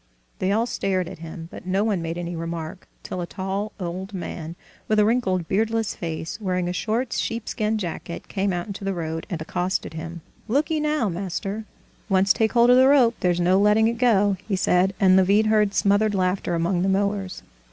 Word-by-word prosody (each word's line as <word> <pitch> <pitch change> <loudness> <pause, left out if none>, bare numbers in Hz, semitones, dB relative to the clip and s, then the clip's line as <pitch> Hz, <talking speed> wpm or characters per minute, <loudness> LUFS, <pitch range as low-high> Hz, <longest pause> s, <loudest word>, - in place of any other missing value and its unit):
They 185 - +1
all 225 +3 +2
stared 190 -6 -1
at - - -9
him, 165 0 -8
but - - -10
no 190 +2 +1
one 205 -5 0
made 165 +1 -4
any 175 0 -4
remark, 165 +2 -5 0.2
till 185 - -4
a 170 - -4
tall 195 +3 -3
old 185 +3 -5
man, 170 -2 -6 0.3
with 215 - +2
a 210 - +5
wrinkled, 190 -7 +1
beardless 225 +1 0
face, 165 +4 -5
wearing 180 -3 -1
a 180 - -2
short 230 +6 -1
sheepskin 220 -1 -1
jacket, 170 -3 -5
came 195 0 -1
out 175 -1 -2
into 200 -1 -7
the 195 -1 -1
road 165 -1 -4
and 175 -5 -3
accosted 180 +2 -2
him. 165 +1 -7 0.3
"Look'ee 300 +7 +1
now, 300 -6 +1
master, 195 +4 -4 0.4
once 195 0 +4
take 220 -1 +1
hold 240 0 +5
of 250 - +7
the 260 +1 +6
rope 265 -4 +5
there's 175 -1 +1
no 180 +2 +3
letting 210 +2 +4
it 230 0 -2
go!" 205 -5 +3
he 200 - 0
said, 185 +1 +2
and 185 -2 +5
Levin 200 +3 +4
heard 210 -2 +2
smothered 205 +1 +3
laughter 185 -1 0
among 175 +2 0
the 190 - +1
mowers. 195 -1 -1
195 Hz, 195 wpm, -24 LUFS, 175-215 Hz, 0.4 s, of